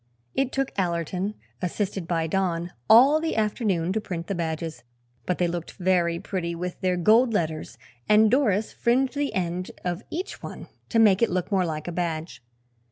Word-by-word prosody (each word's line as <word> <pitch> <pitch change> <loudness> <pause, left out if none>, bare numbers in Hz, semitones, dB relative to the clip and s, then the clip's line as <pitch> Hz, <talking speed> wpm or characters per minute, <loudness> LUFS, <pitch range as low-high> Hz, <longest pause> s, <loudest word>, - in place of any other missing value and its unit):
It 270 -1 0
took 270 -1 -1
Allerton, 180 +3 -1 0.3
assisted 190 -1 -2
by 165 -2 0
Don, 175 0 -1 0.2
all 275 +7 +7
the 325 - -1
afternoon 205 -5 0
to 220 - -1
print 170 -4 -5
the 200 - -3
badges, 160 -2 -3 0.5
but 180 - 0
they 175 - +2
looked 170 -1 -4
very 175 -2 +1
pretty 175 -3 -3
with 180 +1 -5
their 185 -1 +1
gold 225 +6 +4
letters 160 -4 -2 0.3
and 215 0 +6
Doris 220 -6 +2
fringed 255 +2 +1
the 285 -1 -1
end 180 0 -2 0.2
of 175 +2 -2
each 365 +5 -5
one - - -8 0.2
to 230 - 0
make 210 -3 +5
it 230 - +4
look 180 +1 -2
more 190 -2 +2
like 155 0 -4
a - - -2
badge. 165 -3 -3
185 Hz, 175 wpm, -25 LUFS, 170-220 Hz, 0.5 s, all